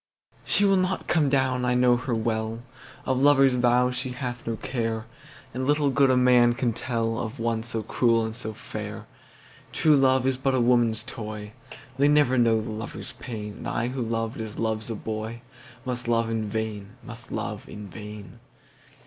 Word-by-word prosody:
She 205 - +3
will 195 -1 +4
not 185 0 0
come, 155 -5 +2 0.3
I 125 0 +2
know 125 0 +5
her 125 0 -2
well, 110 0 -2 0.4
Of 130 0 0
lover's 135 -2 +5
vows 125 0 +3
she 125 0 -3
hath 125 -2 -5
no 115 - -1
care, 115 -1 -3 0.5
And 130 +2 -2
little 145 -1 +3
good 135 0 +4
a 130 - +4
man 125 -1 +5
can 120 -2 0
tellOf 115 0 -2
one 115 -1 -1
so 115 -1 -4
cruel 115 +1 +2
and 110 0 -5
so 115 -2 -5
fair. 110 - -7 0.7
True 155 -2 +4
love 130 -2 +3
is 130 -1 +1
but 130 0 +1
a - - +2
woman's 120 -2 +3
toy, 105 -3 -7 0.5
They 140 - +5
never 145 -4 +4
know 115 -2 +3
the 110 - -5
lover's 110 +1 -6
pain, 105 -4 -7
And - - -7
I 120 +2 -1
who 130 0 -4
loved 115 0 -2
as 110 -2 -7
loves 110 0 -2
a 115 - -2
boyMust 120 +3 -7
love 115 -1 +1
in 110 -2 -2
vain, 110 -1 -4
must 120 -1 -11
love - - -4
in 105 -1 -8
vain. 105 0 -10
120 Hz, 175 wpm, -26 LUFS, 110-130 Hz, 0.7 s, know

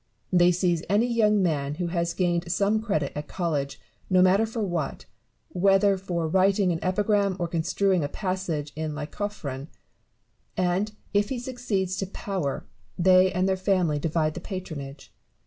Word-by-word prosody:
They 175 0 +6
seize 175 -2 +1
any 205 +4 +3
young 215 -4 +3
man 145 -4 0
who 175 +2 -2
has 170 -1 -1
gained 175 -1 0
some 205 +4 +2
credit 155 -11 -1
at 150 0 -5
college, 150 -6 -2 0.3
no 185 -1 +5
matter 195 +4 +4
for 225 0 -3
what, 175 -4 -3 0.4
whether 195 +2 +3
for 175 -3 -2
writing 190 +2 +3
an 165 - -1
epigram 200 +1 +1
or 175 -2 -1
construing 175 +2 +1
a - - 0
passage 180 -7 -3
in 155 -1 -3
Lycophron; 150 -3 -5 0.9
and, 185 +3 0 0.2
if 205 0 +2
he 265 - -2
succeeds 235 -7 -2
to 195 - -2
power, 185 -7 -3 0.3
they 185 +1 +5
and 185 +1 +1
their 190 - +2
family 185 -5 +1
divide 155 0 0
the 175 - -6
patronage. 155 -7 -7
185 Hz, 155 wpm, -26 LUFS, 165-200 Hz, 0.9 s, They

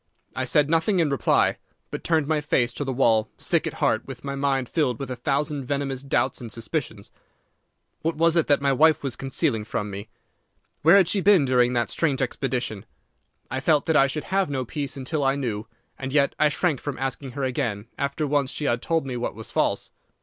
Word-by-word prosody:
I - - -1
said 150 -1 +3
nothing 165 +5 +2
in 160 -5 +2
reply, 140 - +2 0.3
but - - -5
turned 160 -3 +2
my 155 -1 +1
face 125 -5 +1
to 145 - -3
the 135 - -2
wall, 115 -4 +2
sick - - +1
at - - -4
heart, - - 0
with - - -9
my 140 -1 -4
mind 135 -2 0
filled 130 -7 0
with 135 0 -6
a - - -2
thousand 140 +2 -1
venomous 140 -2 -2
doubts 130 -2 0
and 115 -2 -7
suspicions. 115 -2 -4 0.9
What 165 +1 -1
was 165 +1 +3
it 170 - +3
that 145 -1 +3
my 140 -1 +3
wife 155 +3 +4
was 135 -3 -3
concealing 135 -4 -1
from 105 -1 -4
me? 100 +3 -7 0.7
Where 165 +6 +7
had 190 -4 +5
she 195 +2 +2
been 190 -6 +5
during 125 -1 +3
that 120 -1 0
strange 145 -5 0
expedition? 125 -5 -2 0.6
I 130 - -1
felt 150 +1 +2
that 160 - +1
I 135 - +6
should 150 +2 -4
have 195 -4 +2
no 130 -3 -2
peace 140 +2 -4
until 140 +3 -2
I 135 0 +2
knew, 115 -6 -3 0.3
and 130 0 -4
yet 140 -1 +3
I 150 - +5
shrank 150 -2 0
from 145 -2 -4
asking 135 0 -4
her 140 +1 -4
again 125 -6 -2
after 140 +2 -1
once 145 -2 +1
she 150 - -3
had 120 -3 +1
told 165 -4 0
me 130 -2 -4
what 120 - -3
was 110 0 -7
false. - - 0
140 Hz, 215 wpm, -24 LUFS, 125-150 Hz, 0.9 s, Where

